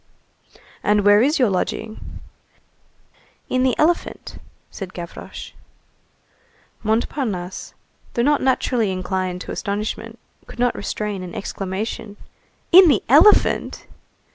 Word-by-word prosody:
"And 210 Hz, -1 st, +2 dB
where 205 Hz, +1 st, +6 dB
is 290 Hz, +6 st, +2 dB
your 245 Hz, -6 st, +3 dB
lodging?" 215 Hz, +3 st, -4 dB, 1.3 s
"In 255 Hz, -, +1 dB
the 255 Hz, -1 st, +2 dB
elephant," 335 Hz, +3 st, -1 dB, 0.3 s
said 190 Hz, -3 st, -8 dB
Gavroche. 170 Hz, -1 st, -8 dB, 1.3 s
Montparnasse, 220 Hz, -4 st, -2 dB, 0.4 s
though 235 Hz, -, +1 dB
not 295 Hz, +2 st, +2 dB
naturally 250 Hz, -5 st, +1 dB
inclined 185 Hz, -1 st, -3 dB
to -, -, -7 dB
astonishment, 205 Hz, +2 st, -4 dB, 0.3 s
could -, -, -12 dB
not 245 Hz, 0 st, +2 dB
restrain 205 Hz, -1 st, -4 dB
an 180 Hz, -2 st, -8 dB
exclamation. 200 Hz, +2 st, -5 dB, 0.5 s
"In 370 Hz, +1 st, +9 dB
the 270 Hz, -10 st, +3 dB
elephant!" 315 Hz, -, +4 dB
215 Hz, 105 wpm, -21 LUFS, 190-255 Hz, 1.3 s, In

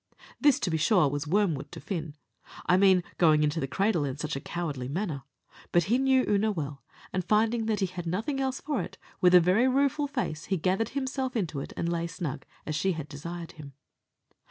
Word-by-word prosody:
This, 290 Hz, -3 st, +4 dB
to 180 Hz, -, 0 dB
be 160 Hz, -, +1 dB
sure, 175 Hz, 0 st, +4 dB
was 145 Hz, +2 st, -3 dB
wormwood 175 Hz, -5 st, +1 dB
to -, -, -7 dB
Fin 160 Hz, -1 st, -5 dB, 0.5 s
I 180 Hz, -, +4 dB
mean 190 Hz, -1 st, +5 dB, 0.2 s
going 155 Hz, -3 st, +5 dB
into 150 Hz, +2 st, +1 dB
the 135 Hz, -, -1 dB
cradle 195 Hz, +1 st, +1 dB
in 135 Hz, -1 st, -3 dB
such 150 Hz, 0 st, -3 dB
a -, -, -2 dB
cowardly 150 Hz, -8 st, -4 dB
manner 155 Hz, -1 st, -3 dB, 0.5 s
but 175 Hz, -, +4 dB
he 250 Hz, -, +4 dB
knew 265 Hz, -1 st, +3 dB
Oonagh 210 Hz, +1 st, +1 dB
well; 145 Hz, -3 st, -4 dB, 0.3 s
and 185 Hz, -, 0 dB
finding 220 Hz, +3 st, +2 dB
that 215 Hz, -2 st, 0 dB
he -, -, +3 dB
had 175 Hz, -2 st, -6 dB
nothing 225 Hz, -, -1 dB
else 265 Hz, 0 st, -1 dB
for 290 Hz, -3 st, -2 dB
it, -, -, -8 dB, 0.2 s
with 180 Hz, -1 st, +6 dB
a -, -, +10 dB
very 185 Hz, +9 st, +3 dB
rueful 280 Hz, +2 st, +2 dB
face 160 Hz, -, -3 dB
he 190 Hz, -, 0 dB
gathered 190 Hz, +6 st, 0 dB
himself 265 Hz, -1 st, -2 dB
into 170 Hz, -10 st, -1 dB
it, -, -, -6 dB
and 170 Hz, -, -1 dB
lay 170 Hz, 0 st, -1 dB
snug, 165 Hz, -4 st, -5 dB, 0.2 s
as 155 Hz, -, -3 dB
she 190 Hz, +5 st, +1 dB
had 155 Hz, -3 st, -6 dB
desired 170 Hz, +3 st, -7 dB
him. 145 Hz, -3 st, -11 dB
180 Hz, 210 wpm, -28 LUFS, 155-220 Hz, 0.5 s, a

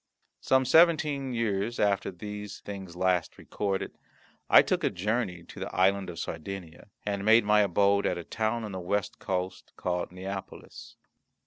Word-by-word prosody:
Some 130 Hz, 0 st, +2 dB
seventeen 150 Hz, -3 st, +4 dB
years 115 Hz, -1 st, -1 dB
after 100 Hz, -1 st, +1 dB
the 105 Hz, +3 st, -7 dB
things 95 Hz, -3 st, -8 dB
last 90 Hz, -2 st, 0 dB
recorded, 100 Hz, -2 st, -3 dB, 0.5 s
I -, -, +8 dB
took -, -, -1 dB
a -, -, +3 dB
journey 95 Hz, -2 st, -2 dB
to -, -, -12 dB
the -, -, -6 dB
Island 95 Hz, 0 st, +2 dB
of 85 Hz, -, -8 dB
Sardinia, 85 Hz, +2 st, -7 dB, 0.2 s
and 100 Hz, -1 st, -2 dB
made 110 Hz, +1 st, +5 dB
my 105 Hz, 0 st, +5 dB
abode 100 Hz, +1 st, +3 dB
at 90 Hz, -, -1 dB
a 85 Hz, -, -5 dB
town 110 Hz, +5 st, -2 dB
on 105 Hz, -, -5 dB
the 95 Hz, -, -5 dB
west 100 Hz, +3 st, -2 dB
coast, 95 Hz, -1 st, -4 dB
called 90 Hz, -1 st, -2 dB
Neapolis. 95 Hz, +1 st, -8 dB
100 Hz, 155 wpm, -28 LUFS, 90-110 Hz, 0.5 s, I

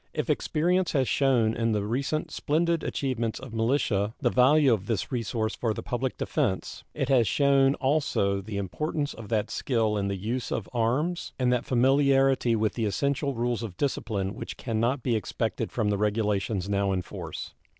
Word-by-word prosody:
If -, -, 0 dB
experience 180 Hz, +3 st, +1 dB
has 135 Hz, -4 st, +2 dB
shewn 125 Hz, -5 st, +2 dB
in 115 Hz, -1 st, 0 dB
the 105 Hz, -1 st, 0 dB
recent 140 Hz, +7 st, -2 dB
splendid 165 Hz, +2 st, 0 dB
achievements 120 Hz, -5 st, -2 dB
of 130 Hz, -3 st, -10 dB
militia 115 Hz, -3 st, 0 dB
the -, -, +1 dB
value 135 Hz, +1 st, +5 dB
of 100 Hz, -3 st, -2 dB
this 115 Hz, +2 st, -2 dB
resource 115 Hz, -2 st, -1 dB
for 110 Hz, -3 st, -1 dB
the -, -, -5 dB
public 125 Hz, +1 st, -2 dB
defense, 120 Hz, -, -2 dB
it -, -, -1 dB
has 125 Hz, -5 st, +4 dB
shewn 140 Hz, +2 st, +3 dB
also 130 Hz, -9 st, +1 dB
the 105 Hz, +1 st, -6 dB
importance 145 Hz, -, -2 dB
of 110 Hz, -3 st, -10 dB
that 110 Hz, -3 st, 0 dB
skill 110 Hz, -5 st, 0 dB
in 100 Hz, -1 st, -1 dB
the 100 Hz, -, -1 dB
use 115 Hz, +6 st, -3 dB
of 110 Hz, -, -2 dB
arms 130 Hz, +10 st, 0 dB
and 125 Hz, -1 st, +2 dB
that 125 Hz, -, 0 dB
familiarity 135 Hz, -1 st, +3 dB
with 110 Hz, -1 st, 0 dB
the 115 Hz, -, -1 dB
essential 140 Hz, +6 st, 0 dB
rules 120 Hz, 0 st, -1 dB
of 105 Hz, -6 st, -6 dB
discipline 105 Hz, -8 st, -1 dB
which -, -, -7 dB
can 115 Hz, -3 st, -2 dB
not 125 Hz, +3 st, 0 dB
be 120 Hz, -3 st, +1 dB
expected 105 Hz, -, -2 dB
from 105 Hz, -2 st, 0 dB
the 100 Hz, -, -1 dB
regulations 105 Hz, -2 st, 0 dB
now 100 Hz, -1 st, +1 dB
in 90 Hz, -1 st, -1 dB
force. -, -, -7 dB
120 Hz, 180 wpm, -27 LUFS, 105-135 Hz, -, value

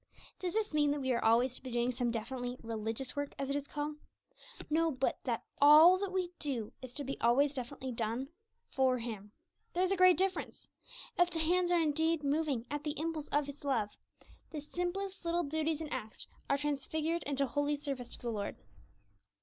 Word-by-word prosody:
Does 360 Hz, -2 st, -2 dB
this 435 Hz, -5 st, 0 dB
mean 295 Hz, -1 st, +3 dB
that 290 Hz, 0 st, 0 dB
we 260 Hz, -1 st, 0 dB
are 235 Hz, -, 0 dB
always 240 Hz, +3 st, +4 dB
to -, -, -4 dB
be 260 Hz, -, -7 dB
doing 240 Hz, +1 st, +1 dB
some 245 Hz, 0 st, -1 dB
definitely 245 Hz, +2 st, -3 dB
'religious' 225 Hz, +3 st, -3 dB
work, 285 Hz, 0 st, -3 dB
as 275 Hz, 0 st, -2 dB
it -, -, +1 dB
is 285 Hz, 0 st, -2 dB
called? 295 Hz, 0 st, -3 dB, 0.7 s
No, 325 Hz, +2 st, +2 dB
but 265 Hz, -3 st, 0 dB
that 240 Hz, -3 st, -1 dB, 0.2 s
all 310 Hz, +6 st, +9 dB
that 400 Hz, -1 st, -2 dB
we 370 Hz, -2 st, -1 dB
do 250 Hz, -8 st, -3 dB
is 255 Hz, -1 st, -8 dB
to 290 Hz, -, -4 dB
be 275 Hz, 0 st, -4 dB
always 270 Hz, +5 st, +4 dB
definitely 260 Hz, 0 st, -5 dB
done 235 Hz, +3 st, -2 dB, 0.4 s
for 260 Hz, -1 st, +3 dB
Him. 215 Hz, -4 st, -6 dB, 0.4 s
There 360 Hz, -, +2 dB
is 375 Hz, -, +1 dB
a -, -, +3 dB
great 370 Hz, -3 st, +6 dB
difference. 380 Hz, +1 st, -2 dB, 0.5 s
If 355 Hz, 0 st, +5 dB
the 340 Hz, -, -4 dB
hands 350 Hz, +3 st, +2 dB
are 350 Hz, -1 st, +4 dB
indeed 320 Hz, 0 st, +1 dB
moving 285 Hz, -4 st, 0 dB
'at 295 Hz, 0 st, -2 dB
the 300 Hz, -1 st, -3 dB
impulse 315 Hz, -2 st, -2 dB
of 290 Hz, 0 st, +1 dB
His 285 Hz, +1 st, -9 dB
love,' 230 Hz, -7 st, 0 dB, 0.5 s
the 310 Hz, -, -5 dB
simplest 360 Hz, +5 st, -3 dB
little 340 Hz, +1 st, +1 dB
duties 315 Hz, +1 st, -1 dB
and 310 Hz, -, -4 dB
acts 215 Hz, 0 st, -5 dB, 0.2 s
are 280 Hz, -, +3 dB
transfigured 300 Hz, +3 st, -1 dB
into 280 Hz, -1 st, +1 dB
holy 290 Hz, +3 st, 0 dB
service 275 Hz, -4 st, -4 dB
to -, -, -16 dB
the 240 Hz, -, -1 dB
Lord. 205 Hz, -2 st, -3 dB
285 Hz, 200 wpm, -33 LUFS, 255-325 Hz, 0.7 s, all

